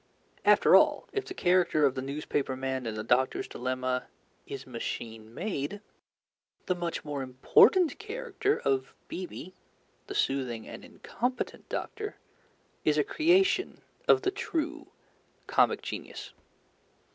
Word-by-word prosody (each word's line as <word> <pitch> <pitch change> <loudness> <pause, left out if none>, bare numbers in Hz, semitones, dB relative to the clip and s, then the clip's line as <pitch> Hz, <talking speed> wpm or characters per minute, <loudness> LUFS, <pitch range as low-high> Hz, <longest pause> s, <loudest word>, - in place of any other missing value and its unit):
After - - +6
all, - - +4
if 410 -1 -1
the 370 - -7
character 175 - +3
of 135 - +3
the 130 - -3
newspaper 140 0 -2
man 130 -1 -3
in 110 - -3
The 110 - -3
Doctor's 125 +3 +1
Dilemma 130 0 -2 0.4
is 135 -2 -6
machine 115 -2 -6
made, 185 - -3 0.9
the 180 - +1
much 175 -3 -4
more 145 -2 -3
important 340 - +4
character 440 -1 -1
of 135 -1 0
B.B., 185 0 -7 0.5
the - - -6
soothing 125 -5 -1
and - - -9
incompetent 250 +3 -4
doctor, 425 -1 -4 0.7
is 150 -1 +3
a 150 - +4
creation 375 - +2 0.3
of 405 - +5
the 385 - +2
true 320 -5 -3 0.6
comic - - +2
genius. - - -7
150 Hz, 125 wpm, -29 LUFS, -, 0.9 s, After